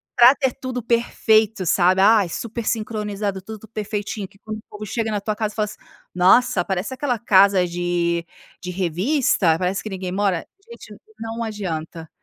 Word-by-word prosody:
pra 245 +2 +8
ter 265 -3 -1
tudo 255 -1 -3
perfeito, 220 -3 +2
sabe. 180 +2 +3
Ai, 205 -2 +5
super 230 +5 -5
sincronizado, 210 -3 -2
tudo 220 +2 -10
perfeitinho. 210 -1 -4 0.4
Quando 210 0 -8
chega 220 +1 -2
na 210 - -1
tua 210 +1 -3
casa 215 -1 -2
e - - -18
fala 215 - +2
assim: 210 - -9 0.4
“Nossa, 195 +6 +4
parece 190 +6 -3
aquela 255 -3 -2
casa 195 -4 +4
de 170 -1 -1 0.5
revista. 185 - +1
Parece 185 +1 -1
que 215 - -5
ninguém 185 -2 -5
mora.”. 195 -3 0 0.2
Gente, 470 - -11 0.2
não 225 +1 -4
adianta, 165 -7 -5
205 Hz, 150 wpm, -22 LUFS, 185-225 Hz, 0.5 s, pra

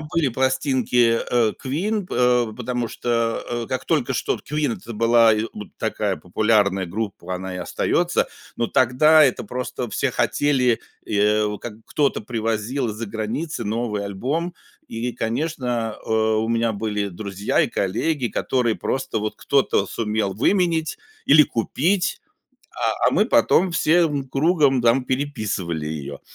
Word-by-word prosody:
были 155 -1 0
пластинки, 130 -2 +2
э, 115 -3 +3
Queen, 185 +9 -1
па 125 -5 +2
потому 125 -1 -3
что, 115 0 -1 0.2
э, - - -11
как 130 0 -3
только 135 -5 0
что - - 0
Queen- 150 -4 -2
это 115 - -9
была 115 0 +5 0.2
вот 105 -1 -8
такая - - -1
популярная 100 +2 +1
группа, 95 -2 -4
она 95 0 -5
и - - -5
остается. - - 0 0.3
Но 120 - 0
тогда 150 +7 +5
это 130 -4 +2
просто 125 -1 -4
все 135 - 0
хотели, 125 +1 +1 0.2
и, 105 - -3
э, 105 0 +2
как 120 -3 -7
кто-то 140 -6 0
привозил 115 +3 -2
из-за 110 +2 -4
границы 115 +8 -4
новый 105 -1 -2
альбом, 145 - -3 0.3
и 120 +2 -3
конечно, 120 -3 -2
э, - - -8
у 110 0 +2
меня 115 -1 +1
были 105 -1 -2
друзья 100 +2 -2
и - - +2
коллеги, 120 - -1
которые 120 0 0
просто 130 -4 -2
вот 105 0 -3
кто-то 140 -1 +1
сумел 105 -3 -1
выменять 165 - +1 0.3
или 150 +2 +8
купить, 165 - 0 0.5
а, - - 0
а - - 0
мы - - +3
потом 180 0 +3
всем 155 -5 +2
кругом 140 -3 +2
там 120 +2 +3
переписывали 110 - -2
её. 70 -2 -6
120 Hz, 140 wpm, -22 LUFS, 110-140 Hz, 0.5 s, или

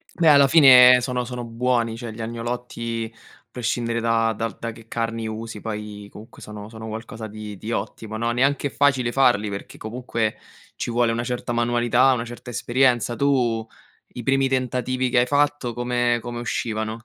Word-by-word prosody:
Poi 165 - +2
alla 140 -2 +7
fine 125 -4 +8
sono 125 0 -2
sono 125 0 -5
buoni, 115 -1 -1
cioè 120 -1 -6
gli 110 +1 -8
agnolotti, 115 0 -4 0.4
prescindere 115 -1 -2
da 115 -1 +2
dal 115 -3 -3
da 115 - -4
che 115 0 -15
carni 115 0 -3
usi 110 0 -6
poi 105 -1 -6
comunque 110 +3 -13
sono 105 0 -9
sono 110 0 -9
qualcosa 110 +1 -7
di 105 -1 -8
di 110 +4 -6
ottimo, 110 -1 -4
no. 115 +2 -1
Neanche 135 +4 +1
è - - -6
facile 130 -4 +2
farli, 120 -6 +3
perché 100 0 -8
comunque 115 -1 -3 0.4
ci - - -4
vuole 120 0 +2
una 115 +1 -2
certa 125 0 -3
manualità, 120 +2 +3
una 120 -2 -2
certa 120 +1 -9
esperienza. 120 0 +1
Tu, 120 -4 +1 0.4
i 125 - -8
primi 135 +2 +2
tentativi 130 0 -1
che 125 - +1
hai 125 - +5
fatto, 145 -2 +1
come 120 0 0
come 120 0 -6
uscivano? 110 -1 -3
120 Hz, 175 wpm, -23 LUFS, 115-125 Hz, 0.4 s, fine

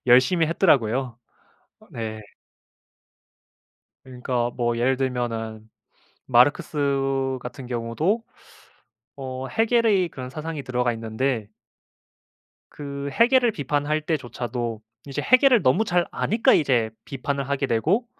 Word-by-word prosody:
열심히 140 +7 +5
했더라고요. 130 - +1 0.7
네. 110 -1 -5 1.8
그러니까 125 -1 -2
뭐 120 -1 -1
예를 130 +2 +1
들면은 115 -4 -3 0.6
마르크스 135 0 +2
같은 130 +1 -8
경우도 130 - -1 0.9
어 130 -1 -5
헤겔의 225 - +2
그런 130 -3 -8
사상이 155 +1 -6
들어가 125 -2 0
있는데 115 0 -2 1.2
그 140 -1 -6
헤겔을 245 0 +4
비판할 145 -1 -1
때조차도 120 -7 -3 0.3
이제 135 - -3
헤겔을 255 -3 +5
너무 175 +12 +3
잘 175 -2 +1
아니까 225 +2 +2
이제 125 -7 +2 0.2
비판을 140 0 -3
하게 140 0 0
되고 165 - +1
135 Hz, 245 characters per minute, -24 LUFS, 120-160 Hz, 1.8 s, 열심히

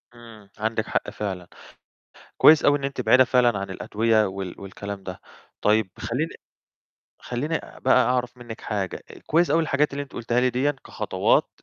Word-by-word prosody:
إمم، 110 -4 -14
عندِك 110 0 -1
حق - - -1
فعلًا. 95 -4 -5 0.9
كويس 155 0 +7
أوي 145 0 +4
إن 140 - -8
أنتِ 140 0 -3
بعيدة 130 0 +6
فعلًا 120 -4 +3
عن 100 -1 -5
الأدوية 110 +2 +1
وال 95 -1 -6
والكلام 100 0 -7
ده. 95 -1 -8 0.4
طيب 105 -2 +2
خلّيني 145 +8 -2 0.9
خلّيني 145 +7 -2 0.2
بقى 130 0 +4
أعرَف 125 0 -1
منِّك 120 -1 -9
حاجة، 100 -4 -3 0.2
كويس 170 +3 +2
أوي 165 - +4
الحاجات 150 -1 +1
اللي 145 0 -3
أنتِ 135 - -19
قلتيها 120 +1 0
لي 125 0 +3
ديًا 130 +4 +1
كخطوات - - +1
120 Hz, 160 wpm, -24 LUFS, 105-130 Hz, 0.9 s, كويس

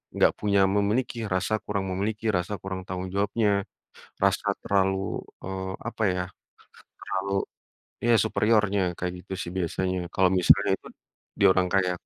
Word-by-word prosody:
enggak - - +5
punya 100 -1 +2 0.2
memiliki, 110 +2 0
rasa 100 +3 0
kurang 100 -2 -2
memiliki, 105 +4 -2
rasa 90 +4 -3
kurang 95 -1 -4
tanggung 95 0 -4
jawabnya. 100 0 +1 0.6
Rasa - - +2 0.2
terlalu, 95 -1 +1 0.2
eee, 95 0 -4 0.2
apa 115 -2 -3
ya, 90 - -1 0.8
terlalu 100 +1 -3 0.8
ya 120 - +5
superiornya 105 -2 +2 0.2
kayak 90 0 -3
gitu - - -10
sih, 85 - -6
biasanya, 95 +1 -1 0.2
kalau 95 -1 +4
misalnya 90 - +5
itu - - -14 0.5
dia - - +6
orang 95 -1 +1
kaya. 95 -2 +3
95 Hz, 140 wpm, -26 LUFS, 95-105 Hz, 0.8 s, dia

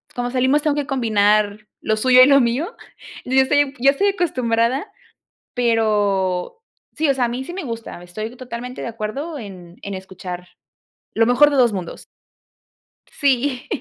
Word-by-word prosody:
cuando 245 0 -2
salimos 260 +3 +2
tengo 300 -2 +1
que 290 -1 -2
combinar 215 -5 +2 0.2
lo 215 - 0
suyo 255 +3 +5
y 255 - +8
lo 275 -1 +6
mío 255 - -1 0.5
yo 260 +1 +2
estoy 285 +1 +2
yo 270 +3 +5
estoy 400 +9 +1
acostumbrada, 260 - 0 0.6
pero 205 - +1 0.4
sí, 315 0 0
o - - +4
sea, 255 -2 0
a - - 0
mí 245 +2 -4
sí 345 - -8
me 380 - -5
gusta, 230 -8 -7
estoy 215 +7 -7
totalmente 250 0 -7
de - - -4
acuerdo 235 +8 -5
en 185 -5 -11
en 200 - -5
escuchar, 185 -1 -8 0.7
lo 225 - +4
mejor 265 +4 +5
de - - 0
2 240 -4 +4
mundos. 180 -4 -6 1.0
Sí 265 -2 0
245 Hz, 160 wpm, -20 LUFS, 215-275 Hz, 1.0 s, y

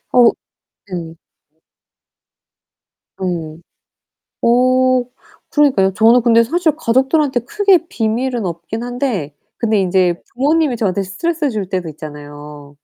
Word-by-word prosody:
어 245 -2 +6 0.6
예. 165 -2 -6 2.0
오. 165 -4 -4 0.8
어 255 +1 +3 0.5
그러니까요. 260 -11 +3
저는 230 +4 +5
근데 230 -1 +4
사실 325 +5 +1
가족들한테 265 0 +1
크게 380 - +2
비밀은 235 - -1
없기는 175 +7 -5
한데 245 - -3 0.2
근데 220 -3 +1
인제 180 -2 +1
부모님이 290 0 +1
저한테 200 -3 0
스트레스를 305 - -2
줄 205 -5 -4
때도 185 -4 -3
있잖아요. 145 -1 -10
230 Hz, 250 characters per minute, -17 LUFS, 180-260 Hz, 2.0 s, 어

